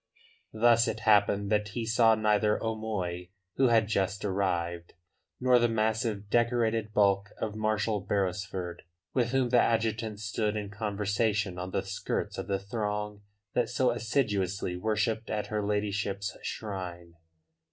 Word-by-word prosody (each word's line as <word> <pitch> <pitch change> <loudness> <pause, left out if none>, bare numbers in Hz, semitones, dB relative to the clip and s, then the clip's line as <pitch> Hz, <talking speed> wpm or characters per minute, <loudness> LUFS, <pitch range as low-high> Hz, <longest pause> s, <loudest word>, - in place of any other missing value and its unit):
Thus 115 +1 +4
it 110 0 -3
happened 100 -2 +3
that 105 -1 +2
he 115 0 -2
saw 115 0 +4
neither 105 0 +2
O'Moy, 105 -6 -3 0.3
who 135 - +5
had 115 -2 +4
just 100 -1 -1
arrived, 85 -3 -1 0.5
nor 125 -1 +5
the 120 0 +3
massive, 110 -1 0
decorated 115 -1 +1
bulk 100 -1 +3
of 105 - -2
Marshal 110 0 0
Beresford, 95 -2 -2 0.3
with 120 -3 +1
whom 130 -1 +1
the 120 0 +5
adjutant 110 -2 0
stood 105 0 -1
in 105 -2 -4
conversation 105 -2 -1
on 90 +1 -4
the 95 - -1
skirts 95 0 -3
of - - -5
the 100 - +1
throng 105 0 -3 0.3
that 120 -2 +1
so 125 0 +2
assiduously 105 -7 -1
worshipped 110 +3 -1
at 105 0 -3
her 105 -1 0
ladyship's 100 -1 -1
shrine. 90 -5 -6
105 Hz, 140 wpm, -29 LUFS, 100-110 Hz, 0.5 s, who